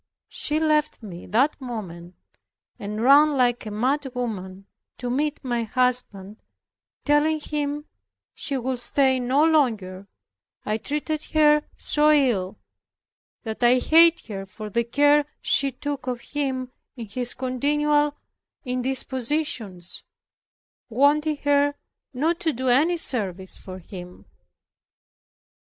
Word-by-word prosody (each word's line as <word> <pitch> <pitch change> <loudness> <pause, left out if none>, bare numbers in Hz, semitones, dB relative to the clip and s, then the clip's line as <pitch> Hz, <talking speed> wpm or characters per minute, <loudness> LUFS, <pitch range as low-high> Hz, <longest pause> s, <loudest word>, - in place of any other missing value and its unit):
She 300 +1 -1
left 305 -4 0
me 180 -4 -9
that 270 +7 +1
moment, 185 -8 -7 0.6
and 210 +2 -4
ran 285 +2 +6
like 245 -3 +1
a - - -3
mad 255 +8 0
woman 195 -6 -5 0.3
to 245 -1 -4
meet 295 +3 -1
my 240 -2 -1
husband 225 -4 -1 0.6
telling 295 +2 +2
him 295 0 -3 0.5
she 275 - -2
would 255 0 -3
stay 265 +1 +2
no 255 +4 +2
longer, 220 - +1 0.6
I 215 +1 -1
treated 300 +4 -3
her 300 -1 +5 0.2
so 300 0 +2
ill, 245 -11 +2 0.9
that 220 +2 -5
I 245 +1 +5
hated 330 +5 +5
her 195 -3 -7
for 210 +1 -9
the 235 +4 +1
care 290 +4 +4 0.2
she 275 0 +2
took 280 +1 -6
of 245 -2 -3
him 265 -3 -3 0.2
in 235 -3 -7
his 245 +4 -3
continual 295 +3 +1 0.5
indispositions, 255 - -2 0.9
wanting 295 +5 +2
her 285 0 +2 0.4
not 315 +6 -1
to 320 -3 0
do 255 +2 -2
any 310 +8 +3
service 190 - -1
for 185 -1 -9
him. 180 0 -11
255 Hz, 120 wpm, -24 LUFS, 220-295 Hz, 0.9 s, ran